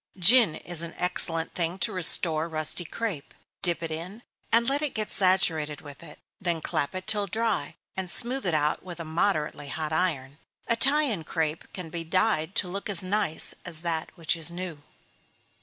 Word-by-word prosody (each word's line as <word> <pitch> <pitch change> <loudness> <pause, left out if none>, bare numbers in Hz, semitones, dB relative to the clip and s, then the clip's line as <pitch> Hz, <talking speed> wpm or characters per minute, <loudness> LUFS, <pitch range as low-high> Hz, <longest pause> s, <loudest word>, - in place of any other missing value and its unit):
Gin 205 -1 +7
is 175 -2 -3
an 170 0 -7
excellent 170 -2 +3
thing 170 +1 -1
to - - +1
restore 165 -2 +3
rusty 155 +2 +1
crape 190 -5 -5 0.3
dip 175 -2 +3
it 165 - -4
in, 180 +9 -7 0.3
and 230 +1 +4
let 280 +2 0
it 300 -3 -2
get 215 -1 -2
saturated 170 -6 +2
with 145 -2 -12
it; 170 - -12 0.2
then 175 -3 -1
clap 155 +2 -2
it 185 0 -5
till 210 -2 -1
dry, 225 +2 -2 0.2
and 190 -1 -3
smooth 250 +4 +1
it 165 - +1
out 150 0 +1
with 175 -2 -9
a 165 - -5
moderately 155 -3 -1
hot 155 +2 -4
iron. 150 -5 -1 0.3
Italian 260 - +2
crape 160 0 -3
can 180 -4 -8
be 170 0 -4
dyed 185 0 0
to 190 - +1
look 200 +3 -6
as 195 -3 +2
nice 190 -4 -1
as 165 -3 -3
that 165 -2 -2
which 165 0 +1
is 165 0 0
new. 170 -3 -6
175 Hz, 180 wpm, -26 LUFS, 160-200 Hz, 0.3 s, Gin